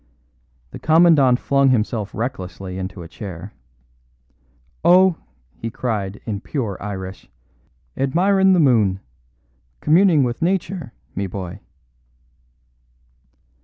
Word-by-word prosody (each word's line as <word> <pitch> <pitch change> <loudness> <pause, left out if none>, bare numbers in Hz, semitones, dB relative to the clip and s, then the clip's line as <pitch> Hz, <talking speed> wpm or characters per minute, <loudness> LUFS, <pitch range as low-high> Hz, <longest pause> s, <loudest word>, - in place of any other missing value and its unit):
The - - -9
Commandant 155 -6 +5
flung 140 -1 +2
himself 110 -3 0
recklessly 95 -5 -5
into 95 -1 -6
a - - -9
chair. 90 -1 -9 1.3
"Oh," 180 +1 +6 0.4
he 115 - -6
cried 105 -5 -3
in 105 -3 -4
pure 115 -9 -3
Irish, 95 -2 -7 0.7
"admirin' 190 +8 +3
the 180 - +3
moon. 110 - +3 0.8
Communing 160 - +4
with 120 -1 -2
Nature, 175 -5 -1 0.2
me 100 +1 -3
bhoy." 95 0 -7
120 Hz, 95 wpm, -21 LUFS, 95-160 Hz, 1.3 s, Oh